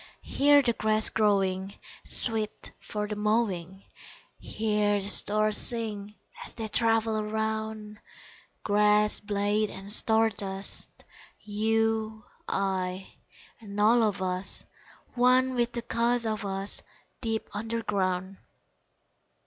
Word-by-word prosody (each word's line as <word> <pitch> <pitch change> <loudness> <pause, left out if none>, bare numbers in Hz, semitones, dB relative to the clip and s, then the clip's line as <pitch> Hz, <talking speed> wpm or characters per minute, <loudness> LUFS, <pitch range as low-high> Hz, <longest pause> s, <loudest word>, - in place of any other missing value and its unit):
Hear 285 0 +4
the 235 -2 +1
grass 215 0 +3
growing 195 -2 0 0.3
Sweet 220 -2 +3
for 210 -1 -5
the 210 - -4
mowing; 200 -4 -1 0.6
Hear 210 -1 0
the 195 - -4
stars 215 +1 +2
sing 210 -3 -2 0.3
As - - -11
they 225 -1 -4
travel 225 -1 +1
around 220 0 -4 0.6
Grass 210 0 +3
blade 205 +1 -1
and 195 +1 -7
star 225 0 +2
dust, 195 -1 -2 0.5
You, 220 +1 -1 0.2
I, 190 -1 -3 0.5
and 205 -2 -8
all 225 +3 +4
of 205 -4 0
us, 185 +1 0 0.5
One 255 +1 +3
with 240 -1 -1
the 235 - -4
cause 235 0 0
of 215 -1 -2
us, 195 0 -2 0.4
Deep 225 -2 -3
underground! 195 -4 -2
215 Hz, 110 wpm, -27 LUFS, 200-225 Hz, 0.6 s, Hear